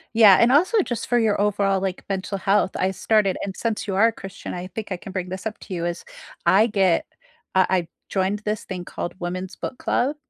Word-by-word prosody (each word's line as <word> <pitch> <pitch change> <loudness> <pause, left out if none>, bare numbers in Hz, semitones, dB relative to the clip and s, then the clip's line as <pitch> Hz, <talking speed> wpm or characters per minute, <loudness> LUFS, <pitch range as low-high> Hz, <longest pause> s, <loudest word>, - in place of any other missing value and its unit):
Yeah, 210 -4 +8
and 235 +1 +5
also 370 - +4
just 240 -7 -4
for 245 - +2
your 215 -3 +2
overall, 200 -2 +1
like, 190 -1 -3
mental 195 0 -3
health 195 0 +2
I 190 - +1
started 200 0 +2
and 195 -1 -5
since 225 -2 -2
you 195 - -1
are 210 +4 +5
a - - +1
Christian, 195 -3 -8
I 180 0 -5
think 205 +3 -7
I 185 - -1
can 195 - -10
bring 185 -1 -4
this 190 +4 -4
up 215 - -6
to 195 - -8
you, 170 -1 -2
is 175 0 -4 0.4
I 210 +4 +5
get 195 -6 +2 0.5
uh, 185 - +5
I 180 -3 +1 0.2
joined 195 +1 0
this 210 0 -2
thing 180 -2 -6
called 175 - -5
Women's 180 +1 -4
Book 250 - -6
Club 275 +5 0
195 Hz, 225 wpm, -23 LUFS, 185-215 Hz, 0.5 s, Yeah